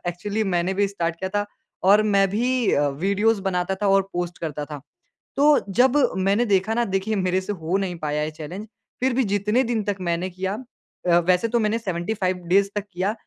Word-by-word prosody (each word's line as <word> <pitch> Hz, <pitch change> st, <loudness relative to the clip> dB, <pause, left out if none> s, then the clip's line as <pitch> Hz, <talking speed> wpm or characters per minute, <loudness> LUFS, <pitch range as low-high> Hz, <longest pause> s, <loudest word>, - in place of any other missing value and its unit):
Actually 205 Hz, +5 st, -2 dB
मैंने 180 Hz, -1 st, 0 dB
भी 200 Hz, +1 st, +2 dB
start 170 Hz, -4 st, -2 dB
किया 190 Hz, -, -3 dB
था 205 Hz, +1 st, -1 dB, 0.4 s
और 210 Hz, +1 st, +6 dB
मैं 200 Hz, -2 st, +3 dB
भी 245 Hz, +3 st, +1 dB
अ, 145 Hz, 0 st, +2 dB
वीडियोज़ 200 Hz, +9 st, +1 dB
बनाता 190 Hz, -1 st, -1 dB
था 205 Hz, -, +3 dB
और 195 Hz, 0 st, +4 dB
पोस्ट 175 Hz, -1 st, -3 dB
करता 150 Hz, -3 st, -4 dB
था। 145 Hz, -1 st, -8 dB, 0.6 s
तो 290 Hz, +1 st, +5 dB
जब 255 Hz, +7 st, +3 dB, 0.2 s
मैंने 195 Hz, +5 st, +2 dB
देखा 200 Hz, +1 st, +1 dB
ना 240 Hz, +1 st, +1 dB
देखिए 195 Hz, +2 st, -1 dB
मेरे 185 Hz, -1 st, +1 dB
से 190 Hz, +2 st, -4 dB
हो 175 Hz, -1 st, -2 dB
नहीं 185 Hz, -3 st, -3 dB
पाया 150 Hz, -1 st, -2 dB
ये 155 Hz, -, -2 dB
चैलेंज 165 Hz, +7 st, -8 dB, 0.3 s
फ़िर 260 Hz, 0 st, +2 dB
भी 260 Hz, +1 st, +2 dB
जितने 210 Hz, +5 st, +2 dB
दिन 230 Hz, -2 st, -1 dB
तक 205 Hz, -1 st, -1 dB
मैंने 175 Hz, +1 st, -1 dB
किया, 190 Hz, +2 st, -3 dB, 0.5 s
अ, 170 Hz, 0 st, +6 dB
वैसे 180 Hz, +5 st, +2 dB
तो 235 Hz, -, +1 dB
मैंने 220 Hz, 0 st, +1 dB
75 185 Hz, -1 st, -2 dB
डेज़ 195 Hz, +2 st, +4 dB
तक 205 Hz, -1 st, -2 dB
किया, 185 Hz, +4 st, -1 dB
195 Hz, 205 wpm, -23 LUFS, 175-215 Hz, 0.6 s, और